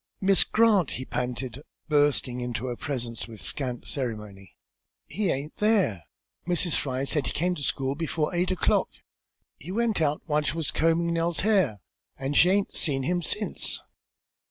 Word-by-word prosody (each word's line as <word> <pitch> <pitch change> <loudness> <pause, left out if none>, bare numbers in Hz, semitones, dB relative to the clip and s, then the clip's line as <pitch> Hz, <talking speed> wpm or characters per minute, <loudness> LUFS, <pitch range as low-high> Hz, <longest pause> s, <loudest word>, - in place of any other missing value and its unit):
"Miss 195 0 +5
Grant," 215 -5 +3
he 130 - -5
panted, 125 +1 -3 0.3
bursting 145 -4 +2
into 120 0 -3
her 125 -1 -3
presence 120 -4 -4
with 110 -2 -11
scant 125 - -3
ceremony, 105 -7 -4 0.5
"he 205 -3 -1
aint 145 +2 -3
there! 195 - +2 0.4
Mrs. 175 -2 +2
Fry 130 -1 -1
says 150 +2 +1
he - - -1
came 180 +4 0
to 175 - -6
school 135 -1 0
before 155 +1 -2
eight 175 +1 +1
o'clock. 185 - +2 0.7
He 170 - -8
went 225 -3 +1
out 150 -1 +1
while 150 -2 +1
she 150 +2 -2
was 160 -3 -1
combin' 165 +1 +2
Nellie's 170 0 0
hair, 185 - +2 0.4
an' 135 +1 -2
she 175 +5 +6
aint 200 +1 +1
seen 135 -4 +1
him 175 +5 0
since!" 205 +6 -3
150 Hz, 160 wpm, -27 LUFS, 130-180 Hz, 0.7 s, she